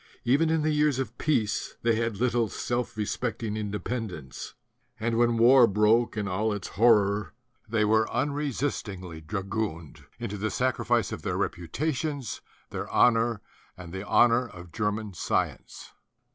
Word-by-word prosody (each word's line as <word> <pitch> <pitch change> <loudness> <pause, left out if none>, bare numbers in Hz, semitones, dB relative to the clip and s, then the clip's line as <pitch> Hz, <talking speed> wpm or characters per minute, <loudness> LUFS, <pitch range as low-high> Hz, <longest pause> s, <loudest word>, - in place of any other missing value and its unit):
Even 145 +7 +3
in 160 -1 +1
the 155 - +2
years 150 -3 +2
of 130 -3 -3
peace 110 -8 0
they 115 0 +3
had 115 -2 -1
little 120 -1 +1
self 120 -1 -3
respecting 105 +1 -2
independence; 105 - -5 0.4
and 115 +1 0
when 120 0 +3
war 120 +1 +7
broke 110 +3 +3
in 105 -2 -1
all 105 +4 0
its 105 -3 -4
horror 105 -2 +3 0.3
they 110 -1 +2
were 110 +1 +3
unresist 145 -3 -1
ingly 90 -4 -9
dragooned 85 -5 -4
into 105 -3 -5
the 110 +2 -1
sacrifice 130 +5 0
of - - -5
their - - -2
repu 85 -1 -3
tations, 145 - -2 0.3
their - - -4
honor 115 -3 +3 0.4
and 90 -2 -10
the 95 +1 -4
honor 120 +3 +4
of 90 -4 -12
German 105 +2 -2
science 85 - -3
(191? - - -38
110 Hz, 150 wpm, -27 LUFS, 100-120 Hz, 0.4 s, war